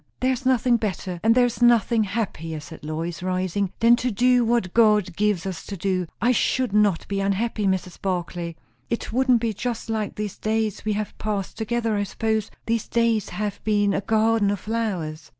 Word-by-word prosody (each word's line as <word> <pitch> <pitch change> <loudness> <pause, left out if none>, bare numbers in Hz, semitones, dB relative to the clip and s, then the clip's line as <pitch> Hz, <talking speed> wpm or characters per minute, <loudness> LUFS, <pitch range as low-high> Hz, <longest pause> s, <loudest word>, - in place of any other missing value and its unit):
"There 260 +1 +2
is 255 +1 -3
nothing 250 -1 +3
better, 185 -4 -3
and 225 +1 +4
there 250 -1 +5
is 245 0 -3
nothing 235 -2 +4
happier," 180 -6 -3
said 150 - -11
Lois, 160 +3 -4
rising, 185 +1 -1
"than 235 +1 +7
to 250 - -1
do 245 +3 +3
what 230 -6 0
God 210 -6 +4
gives 205 -3 +1
us 180 -4 -4
to 200 - -5
do. 185 -1 -1
I 240 - +3
should 255 -2 +1
not 210 -5 +2
be 200 -1 -2
unhappy, 200 +2 0
Mrs. 185 -1 -2
Barclay. 175 -2 -3 0.3
It 235 - -3
wouldn't 255 -2 +3
be 230 -2 0
just 230 +2 -4
like 215 -2 -2
these 210 -2 -5
days 220 -1 -1
we 215 - +1
have 210 0 -3
passed 205 -3 -3
together, 225 0 -1
I - - +1
suppose; 220 0 -1 0.2
these 230 -1 -1
days 230 -3 +1
have 210 -1 -4
been 205 -2 +2
a - - 0
garden 220 0 +2
of 200 -1 -2
flowers." 180 -9 -3
210 Hz, 190 wpm, -24 LUFS, 190-230 Hz, 0.3 s, than